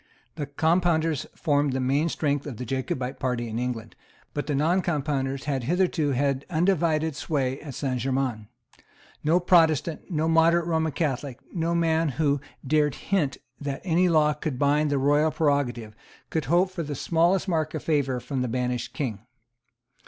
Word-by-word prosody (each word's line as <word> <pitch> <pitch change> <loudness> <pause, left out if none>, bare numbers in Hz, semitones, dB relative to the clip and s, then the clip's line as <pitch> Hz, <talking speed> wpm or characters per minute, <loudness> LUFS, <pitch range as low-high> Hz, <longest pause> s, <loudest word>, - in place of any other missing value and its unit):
The 150 -3 -5
Compounders 160 0 +1
formed 145 -4 +1
the 130 - -1
main 140 +6 +1
strength 145 -2 -1
of 130 -6 -6
the 125 - -5
Jacobite 130 +1 -3
party 125 -3 -1
in 115 +1 -3
England; 120 -2 -4 0.4
but 145 - -3
the 145 - 0
Noncompounders 145 -4 0
had 135 -5 -2
hitherto 175 -1 +1
had 140 +1 0
undivided 160 -3 +1
sway 135 -4 -2
at 145 -4 -8
Saint 130 -3 -2
Germains. 130 -4 -1 0.8
No 165 +4 +4
Protestant, 165 -3 +2
no 160 -3 0
moderate 165 +1 +4
Roman 160 -2 0
Catholic, 140 -4 -2
no 170 -1 0
man 165 -1 +2
who 145 -3 +2 0.2
dared 150 0 +2
to - - -11
hint 165 -10 0 0.2
that 140 -2 -4
any 180 0 +3
law 155 -2 +4
could 150 -2 -4
bind 145 +2 +2
the 145 - +1
royal 145 +3 +3
prerogative, 140 -8 0 0.4
could 160 -2 -1
hope 175 +4 +3
for 185 -2 -4
the 150 -2 -4
smallest 170 +7 +2
mark 160 -3 0
of 155 - -4
favour 140 -5 +1
from 130 +1 -3
the 125 - 0
banished 125 0 -2
King. 115 -5 -4
150 Hz, 165 wpm, -26 LUFS, 135-160 Hz, 0.8 s, No